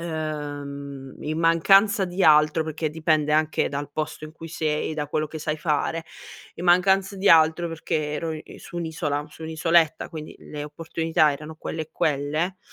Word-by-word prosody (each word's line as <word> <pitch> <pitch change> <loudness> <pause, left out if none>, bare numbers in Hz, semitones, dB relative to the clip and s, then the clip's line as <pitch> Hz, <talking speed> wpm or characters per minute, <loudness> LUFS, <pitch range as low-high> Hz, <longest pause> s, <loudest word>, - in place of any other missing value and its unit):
ehm, 145 -4 -5
in 155 +1 -2
mancanza 195 +5 +5
di 180 +1 -2
altro, 155 0 +5
perché 155 0 -3
dipende 155 -1 +1
anche 155 0 +2
dal 145 0 -4
posto 155 0 -4
in 155 - -9
cui 165 +1 -10
sei, 155 -1 -2
da 150 -2 -3
quello 155 +1 -1
che 155 +1 -8
sai 150 0 -2
fare. 155 +1 -1 0.5
In 175 - -7
mancanza 190 +2 +3
di 195 +1 +1
altro 160 +1 +5
perché 155 -2 -2
ero 160 +1 -2
i 155 -1 -9
su - - -10
un'isola, 160 -3 -2
su 155 - -13
un'isoletta, 160 0 +2
quindi 155 -1 -8
le 150 -1 -7
opportunità 160 0 +1
erano 155 +2 -8
quelle 160 - -5
e 155 - -10
quelle, 155 +4 -1
155 Hz, 170 wpm, -24 LUFS, 150-165 Hz, 0.5 s, mancanza